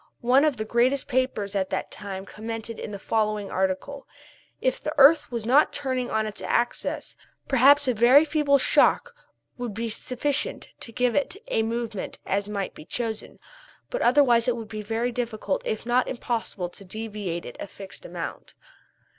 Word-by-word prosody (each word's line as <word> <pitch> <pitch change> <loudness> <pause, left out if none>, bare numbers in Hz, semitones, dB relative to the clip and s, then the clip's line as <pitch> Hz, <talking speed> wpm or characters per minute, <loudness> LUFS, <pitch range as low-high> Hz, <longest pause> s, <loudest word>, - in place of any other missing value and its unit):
One 255 +5 +4
of 300 -4 +1
the 215 - -3
greatest 245 +5 +2
papers 250 -6 -1
at 190 -1 0
that - - -3
time 195 -2 -7
commented 225 +2 -6
in - - -5
the 205 - -6
following 210 0 -1
article: 190 +10 -2 0.5
"If - - 0
the 305 - -3
earth 290 +2 +6
was 230 -2 -3
not 270 +6 +5
turning 260 -3 -2
on 220 0 0
its 215 -1 -6
axis, 240 0 -1 0.3
perhaps 280 +2 +5
a 255 - +3
very 245 +7 +6
feeble 295 -2 +3
shock 485 - +3 0.5
would 240 -5 -4
be 230 +1 -2
sufficient 265 +6 -2
to 230 - -9
give 245 +1 +1
it 285 +5 0
such 405 +4 -15
a 225 - +2
movement 225 -2 -3
as 200 +1 -1
might 200 -2 -3
be - - -11
chosen, 225 +4 -4 0.5
but - - -2
otherwise 245 -3 +4
it 245 - +2
would 225 -2 -7
be 215 -1 -5
very 225 +3 -1
difficult 240 +2 -2
if 215 +1 -3
not 245 +1 +2
impossible 230 -7 -3
to 185 - -13
deviate 205 -3 -5
it 120 - -8
a - - -5
fixed 195 0 -10
amount." - - -7
235 Hz, 175 wpm, -25 LUFS, 210-260 Hz, 0.5 s, earth